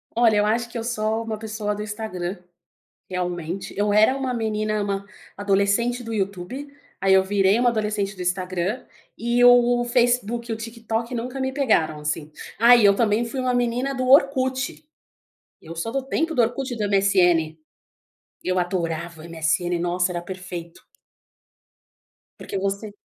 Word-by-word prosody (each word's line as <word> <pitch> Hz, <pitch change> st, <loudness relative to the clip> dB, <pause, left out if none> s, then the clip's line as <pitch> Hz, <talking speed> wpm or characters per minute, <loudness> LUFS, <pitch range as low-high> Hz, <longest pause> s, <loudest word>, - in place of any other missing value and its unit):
Olha, 230 Hz, -2 st, +4 dB
eu 205 Hz, -, +3 dB
acho 235 Hz, +2 st, 0 dB
que 235 Hz, -, -7 dB
eu 225 Hz, -, -3 dB
sou 220 Hz, -1 st, -1 dB
uma 220 Hz, -1 st, -4 dB
pessoa 215 Hz, -1 st, -3 dB
do 210 Hz, -, -5 dB
Instagram. 205 Hz, -4 st, -4 dB, 0.7 s
Realmente 180 Hz, 0 st, -4 dB
eu 205 Hz, 0 st, +1 dB
era 215 Hz, +5 st, +5 dB
uma 260 Hz, -2 st, -2 dB
menina, 215 Hz, -2 st, -1 dB
uma 200 Hz, -1 st, -2 dB, 0.3 s
adolescente 205 Hz, +5 st, +1 dB
do 230 Hz, -1 st, -5 dB
YouTube. 200 Hz, +7 st, -3 dB, 0.3 s
Aí 195 Hz, 0 st, +4 dB
eu 190 Hz, 0 st, +6 dB
virei 195 Hz, +2 st, +2 dB
uma 245 Hz, -1 st, +4 dB
adolescente 210 Hz, -3 st, -2 dB
do 185 Hz, -, -8 dB
Instagram 185 Hz, +5 st, -2 dB, 0.3 s
e 235 Hz, +1 st, +1 dB
o 245 Hz, 0 st, +6 dB
Facebook 240 Hz, -1 st, +1 dB
e -, -, +1 dB
o 220 Hz, -, -4 dB
TikTok 230 Hz, +1 st, -4 dB
nunca 250 Hz, +3 st, -4 dB
me 265 Hz, 0 st, -1 dB
pegaram, 165 Hz, -, +1 dB
assim. 150 Hz, 0 st, -3 dB, 0.3 s
Ah, 235 Hz, +2 st, +8 dB
e 230 Hz, -4 st, +4 dB
eu 200 Hz, 0 st, +6 dB
também 220 Hz, 0 st, +2 dB
fui 245 Hz, +3 st, -5 dB
uma 255 Hz, -1 st, 0 dB
menina 245 Hz, +3 st, 0 dB
do 255 Hz, 0 st, -2 dB
Orkut. 260 Hz, -1 st, +3 dB, 0.8 s
Eu 165 Hz, -, -9 dB
só 170 Hz, +8 st, -3 dB
dou 270 Hz, +1 st, -2 dB
tempo 320 Hz, +5 st, -1 dB
do 245 Hz, -, +4 dB
Orkut 245 Hz, +3 st, -1 dB
e -, -, -5 dB
do 210 Hz, -2 st, -1 dB
MSN. 180 Hz, -5 st, +3 dB, 0.9 s
Eu 185 Hz, 0 st, 0 dB
adorava 170 Hz, -2 st, -3 dB
o -, -, -12 dB
MSN, 170 Hz, +2 st, 0 dB
nossa 180 Hz, +1 st, 0 dB
era 175 Hz, -, -3 dB
perfeito. 175 Hz, -2 st, -8 dB, 1.5 s
Porque 195 Hz, -, -5 dB
você 200 Hz, +2 st, -3 dB
215 Hz, 165 wpm, -23 LUFS, 185-240 Hz, 1.5 s, Ah